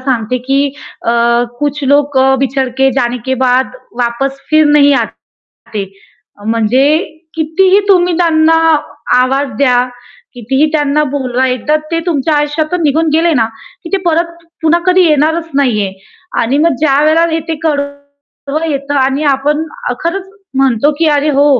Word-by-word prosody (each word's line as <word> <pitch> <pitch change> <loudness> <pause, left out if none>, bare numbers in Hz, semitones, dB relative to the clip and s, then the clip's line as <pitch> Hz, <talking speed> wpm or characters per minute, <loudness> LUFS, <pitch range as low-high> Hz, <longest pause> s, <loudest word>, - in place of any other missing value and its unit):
सांगते 250 -2 -1
की 275 +1 +2 0.5
अ, - - +3 0.5
कुछ 290 0 -2
लोक 285 0 +2
अ, 265 0 +4
बिछडके 265 0 0
जाने 245 -2 -1
के 260 - +1
बाद 250 0 +2 0.3
वापस 255 +3 -1
फिर 310 0 +5
नही 285 -1 +5 0.5
आते. 205 -3 -7 0.6
म्हणजे 230 +4 +2 0.5
कितीही 370 +5 +2
तुम्ही 360 -2 +4
त्यांना 325 -2 +3 0.6
आवाज 270 +2 +1
द्या, 250 -3 +3 0.5
कितीही 265 +5 0
त्यांना 300 -1 +1
बोलवा, 260 -2 -1
एकदा 255 +4 0 0.2
ते 330 - 0
तुमच्या 305 -2 0
आयुष्यातून 310 +4 -1
निघून 315 +2 +1
गेले 330 +1 +3
ना, 230 -5 +2 0.4
की 335 - -8
ते - - +4
परत 340 +1 +1 0.3
पुन्हा 325 +1 +3
कधी 370 0 +4
येणारच 320 +2 +1
नाहीये. 215 -8 +1 0.5
आणि 250 +5 0
मग 320 -1 +2
ज्यावेळेला 310 +3 +3
हे 325 - 0
ते 325 - -2
कडवं 285 0 -4
येतं 280 0 -3
आणि 270 +3 0
आपण 295 +3 0 0.3
अ, - - 0
खरंच 380 +3 -3 0.3
म्हणतो 270 +1 +2
की 330 - +2
"अरे 295 0 +2
हो, 285 +1 +3
285 Hz, 145 wpm, -13 LUFS, 265-315 Hz, 0.6 s, फिर